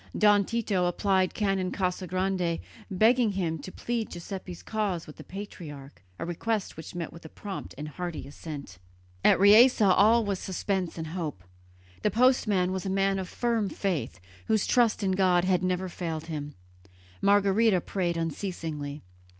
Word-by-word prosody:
Don 205 -1 +5
Tito 205 -5 0
applied 190 +1 +2
to - - -23
Canon 195 -3 +1
Casagrande, 185 -1 -1 0.3
begging 220 +3 +3
him 165 -4 -1
to 165 +6 -8
plead 230 +1 -3
Giuseppe's 180 0 -7
cause 205 -6 -2
with 150 - -12
the - - -9
patriarch, 150 - -9
a - - -4
request 200 +5 -2
which 160 +2 -9
met 170 -2 -4
with 170 - -12
a 160 - -9
prompt 200 +3 -7
and 150 - -5
hearty 170 -1 -5
assent. 140 - -8 0.4
At - - +5
Riese 220 +7 +7
all 215 +3 +5
was 200 -2 -1
suspense 190 -2 -2
and 160 - -4
hope. 155 - -4 0.6
The 210 - +2
postman 215 -5 +3
was 190 +1 -3
a - - -1
man 195 0 +1
of 185 - -5
firm 230 -4 0
faith, 170 - -2 0.3
whose 220 -2 +2
trust 235 -3 +3
in 190 - +2
God 185 -2 +3
had 185 -2 +2
never 185 0 0
failed 165 -3 -4
him; 150 -3 -5 0.7
Margherita 200 0 +4
prayed 175 -1 -2
unceasingly. 160 -3 -4
185 Hz, 160 wpm, -28 LUFS, 170-205 Hz, 0.7 s, Riese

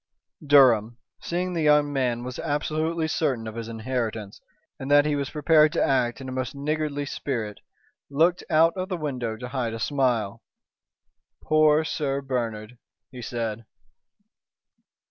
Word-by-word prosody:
Durham, 120 -6 +5 0.2
seeing 180 +1 -2
the 165 - -1
young 150 -1 +3
man 125 -3 0
was 125 0 -6
absolutely 155 +2 -1
certain 135 -8 -1
of 110 - -6
his 115 0 -6
inheritance, 115 -3 -4 0.4
and 135 - -6
that 145 0 +6
he 150 -1 +1
was 140 -1 -2
prepared 155 0 +4
to - - +1
act 120 -4 +1
in 130 - -8
a - - -5
most 130 +1 -4
niggardly 145 0 -2
spirit, 115 -7 -4 0.5
looked 165 +6 +2
out 165 0 +4
of 185 0 -4
the 185 - -2
window 125 -8 -3
to 125 +2 -7
hide 120 -4 -2
a - - -6
smile. 125 -6 0 1.0
"Poor 155 0 +4
Sir 140 -3 -2
Bernard," 120 -4 -4 0.3
he 125 -1 -9
said. 115 -2 -4
135 Hz, 145 wpm, -25 LUFS, 120-150 Hz, 1.0 s, that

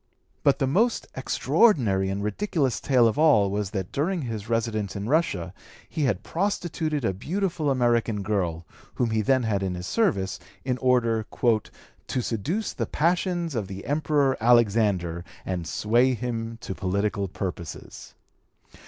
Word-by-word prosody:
But 140 - +3
the 135 - +1
most 210 - +1
extraordinary 110 - +2
and 100 +1 -2
ridiculous 135 - 0
tale 125 -4 +4
of 115 +6 -1
all 110 -11 +5
was 100 -1 -1
that 95 -3 -4
during 165 +3 -1
his 110 -3 -5
residence 110 -3 -1
in 100 +1 -4
Russia 100 - 0 0.3
he 155 -3 -1
had 105 -6 0
prostituted 165 - -1
a 95 - +1
beautiful 170 - -1
American 120 -5 +1
girl, 90 -5 -1 0.3
whom 120 -2 0
he 110 0 +1
then 130 +4 +2
had 105 -3 0
in 95 -2 -2
his 90 0 -6
service, 130 - 0 0.3
in 125 -1 -1
order 115 -4 +2 0.2
"to 120 +2 -1
seduce 155 - -2
the - - -3
passions 175 0 0
of 110 -6 -2
the 95 0 -8
Emperor 145 -2 +2
Alexander 105 -7 +3
(p. 85 - -16
210) 95 - -3
and 85 -3 -4
sway 120 +9 +2
him 115 -1 -4
to - - -5
political 100 +2 -1
purposes." 90 -3 -7
115 Hz, 155 wpm, -26 LUFS, 100-145 Hz, 0.3 s, all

